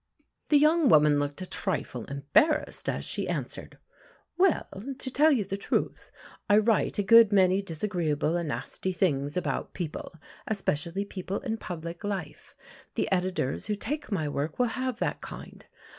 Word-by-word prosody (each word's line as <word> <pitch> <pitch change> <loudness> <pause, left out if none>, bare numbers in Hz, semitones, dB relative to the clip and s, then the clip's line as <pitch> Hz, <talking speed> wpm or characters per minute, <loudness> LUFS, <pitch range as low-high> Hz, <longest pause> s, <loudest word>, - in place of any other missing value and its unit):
The 295 - +6
young 305 0 +4
woman 150 -1 +5
looked 145 +4 -3
a - - -4
trifle 180 - -3
embarrassed, 145 - +1
as - - -3
she - - -2
answered: - - -5 0.6
"Well, 370 -2 +3 0.3
to 260 - -4
tell 305 +4 +5
you 235 -8 +2
the 195 +1 -4
truth, 200 - -2 0.4
I 205 - +6
write 215 0 +2
a 205 - +1
good 230 +2 +7
many 190 -1 +4
disagreeable 165 -4 -1
and 170 -3 -2
nasty 185 +5 -3
things 145 -4 0
about 180 - -3
people, 170 -2 -5 0.3
especially 190 -2 -1
people 195 0 -5
in 225 -4 -3
public 170 -3 -7
life. 195 -7 -5 0.4
The - - -1
editors 185 -7 -1
who 210 - 0
take 290 +6 -4
my 160 -7 0
work 145 +2 -3
will 245 -1 +2
have 255 -2 -2
that - - -2
kind. - - -10
190 Hz, 160 wpm, -28 LUFS, 160-220 Hz, 0.6 s, good